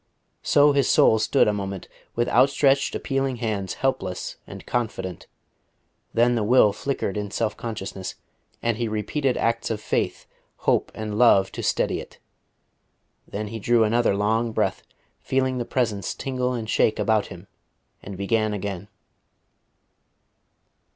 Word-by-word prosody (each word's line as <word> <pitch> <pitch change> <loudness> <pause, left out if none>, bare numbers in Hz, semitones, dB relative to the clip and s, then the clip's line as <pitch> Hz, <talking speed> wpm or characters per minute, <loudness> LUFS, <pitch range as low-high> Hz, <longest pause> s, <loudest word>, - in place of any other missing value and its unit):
So 145 0 +5
his 140 -1 +2
soul 110 - +5
stood - - +3
a 105 - +2
moment, 100 -2 -5 0.3
with 120 +1 +1
outstretched 135 +1 +3
appealing 135 -1 -1
hands, 110 -5 -3
helpless 95 -9 -2
and - - -10
confident. 95 -7 -3 0.8
Then 120 +1 +3
the 115 -3 0
will 105 -2 +5
flickered 110 -4 -3
in 105 -1 -3
self 110 +2 -1
consciousness, 95 -4 -6 0.5
and 115 -2 0
he 120 -1 -1
repeated 120 +6 -1
acts 115 0 0
of 110 -2 -2
faith, - - -2 0.4
hope - - +2
and 110 -1 -4
love 100 -6 +5
to - - -6
steady - - 0
it. - - -11 1.1
Then 105 +1 -5
he 115 +1 -6
drew 115 +2 +3
another 115 -1 +2
long 110 +3 0
breath, - - 0 0.4
feeling 130 -1 0
the 120 - -2
Presence 110 -7 -1
tingle 125 -2 -2
and 115 -3 -4
shake 110 - +2
about 110 -2 +1
him, 90 +2 -11 0.6
and 100 - -8
began 110 +2 0
again. 100 -1 -5
110 Hz, 140 wpm, -24 LUFS, 105-125 Hz, 1.1 s, So